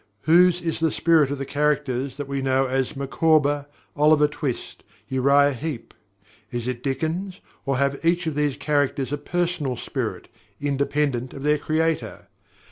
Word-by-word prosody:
Whose 175 Hz, +2 st, +4 dB
is 165 Hz, -1 st, -2 dB
the 160 Hz, 0 st, +2 dB
"spirit" 155 Hz, -3 st, +3 dB
of 140 Hz, -, -3 dB
the 135 Hz, -, -4 dB
characters 140 Hz, -2 st, -1 dB
that 145 Hz, -1 st, -5 dB
we 140 Hz, -1 st, -2 dB
know 135 Hz, 0 st, +2 dB
as 130 Hz, 0 st, -1 dB
Micawber, 145 Hz, 0 st, +2 dB, 0.3 s
Oliver 150 Hz, 0 st, +5 dB
Twist, 145 Hz, -4 st, -5 dB, 0.2 s
Uriah 140 Hz, +2 st, +3 dB
Heep 135 Hz, -1 st, -6 dB, 0.6 s
is 120 Hz, 0 st, -4 dB
it 125 Hz, -1 st, -3 dB
Dickens, 165 Hz, +8 st, -3 dB, 0.3 s
or 135 Hz, -1 st, +1 dB
have 140 Hz, +2 st, 0 dB
each 170 Hz, +1 st, +2 dB
of 160 Hz, -, -1 dB
these 145 Hz, -1 st, 0 dB
characters 145 Hz, -2 st, 0 dB
a -, -, 0 dB
personal 165 Hz, -5 st, -2 dB
spirit, -, -, -4 dB, 0.3 s
independent 140 Hz, -2 st, -1 dB
of 135 Hz, -, -7 dB
their 150 Hz, 0 st, +2 dB
creator? 160 Hz, +2 st, -1 dB
145 Hz, 150 wpm, -23 LUFS, 135-155 Hz, 0.6 s, Oliver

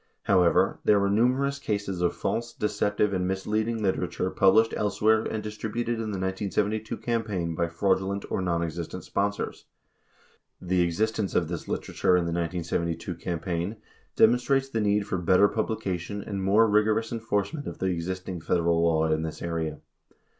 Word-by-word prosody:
43 -, -, +2 dB
However, 90 Hz, -2 st, +3 dB
there 105 Hz, -, +5 dB
were 100 Hz, 0 st, +1 dB
numerous 130 Hz, +6 st, +2 dB
cases 100 Hz, -7 st, -2 dB
of 85 Hz, -, +1 dB
false, 120 Hz, +1 st, -2 dB
deceptive, 105 Hz, -1 st, 0 dB
and 90 Hz, -1 st, 0 dB
misleading 110 Hz, +4 st, -1 dB
literature 95 Hz, -1 st, -1 dB
pub 95 Hz, -1 st, +4 dB
lished 115 Hz, 0 st, +4 dB, 0.6 s
and 110 Hz, -, -3 dB
distributed 110 Hz, +2 st, -3 dB
in 110 Hz, -1 st, -3 dB
the 100 Hz, -, -3 dB
1972 100 Hz, +3 st, -1 dB
campaign 105 Hz, -8 st, -2 dB
by 85 Hz, +1 st, 0 dB
fraudulent 95 Hz, +3 st, 0 dB
or -, -, 0 dB
non 85 Hz, -2 st, 0 dB
existent 85 Hz, 0 st, -5 dB
sponsors. 100 Hz, +1 st, -2 dB, 0.9 s
The 90 Hz, 0 st, +1 dB
existence 105 Hz, +4 st, 0 dB
of 85 Hz, -2 st, +1 dB
this 85 Hz, -2 st, -5 dB
literature 90 Hz, -, +1 dB
in 90 Hz, -, 0 dB
the 85 Hz, -, -2 dB
1972 85 Hz, 0 st, -2 dB
cam 85 Hz, 0 st, -4 dB
paign 90 Hz, +4 st, -2 dB, 0.4 s
demonstrates 125 Hz, +4 st, +3 dB
the 115 Hz, -4 st, -1 dB
need 105 Hz, 0 st, +2 dB
for 95 Hz, -3 st, -2 dB
better 90 Hz, +3 st, +5 dB
publication 100 Hz, -3 st, -3 dB
and 100 Hz, -2 st, -4 dB
more 105 Hz, +4 st, +5 dB
rigorous 110 Hz, +1 st, +2 dB
enforcement 115 Hz, +5 st, -2 dB
of -, -, -6 dB
the -, -, -3 dB
existing 90 Hz, +1 st, -4 dB
Federal 85 Hz, 0 st, +1 dB
law 80 Hz, -1 st, +3 dB
in 80 Hz, 0 st, +1 dB
this 80 Hz, -1 st, -5 dB
area. 80 Hz, -3 st, -3 dB
95 Hz, 160 wpm, -27 LUFS, 85-110 Hz, 0.9 s, there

